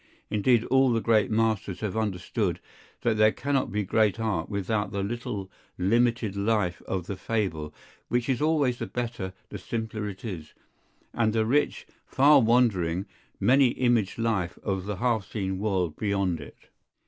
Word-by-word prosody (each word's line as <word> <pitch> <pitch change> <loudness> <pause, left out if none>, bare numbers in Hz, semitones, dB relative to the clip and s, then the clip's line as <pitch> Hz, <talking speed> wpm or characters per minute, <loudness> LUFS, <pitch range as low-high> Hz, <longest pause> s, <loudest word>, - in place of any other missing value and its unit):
Indeed 115 +2 +3
all 130 0 +3
the 115 - +2
great 110 -3 +2
Masters 110 -4 0
have 110 -2 -3
understood, 105 -5 -1 0.4
that 115 -2 +1
there 110 0 +5
cannot 140 +1 -1
be 105 +1 0
great 110 +2 +2
art 105 -7 -1
without 105 +1 -1
the 100 -1 -2
little 105 -3 -4 0.3
limited 115 +2 +1
life 100 -3 0
of 95 -3 -2
the 100 - -4
fable, 95 -8 -2 0.4
which 120 -1 0
is 130 -1 0
always 150 -6 +2
the - - -3
better 120 -6 -4 0.2
the - - -7
simpler 110 -2 -4
it 95 +3 -9
is, 85 -8 -7 0.6
and 110 -2 +1
the 110 -1 +2
rich, 145 +6 +1 0.2
far 140 +1 +6
wandering, 100 -7 +2 0.3
many 135 +2 +5
imaged 120 -6 +1
life 110 -7 -1
of 95 -1 -2
the 105 - -2
half 115 -1 0
seen 95 -3 -2
world 95 -6 0
beyond 100 -5 0
it. 70 - -14
110 Hz, 160 wpm, -27 LUFS, 95-120 Hz, 0.6 s, far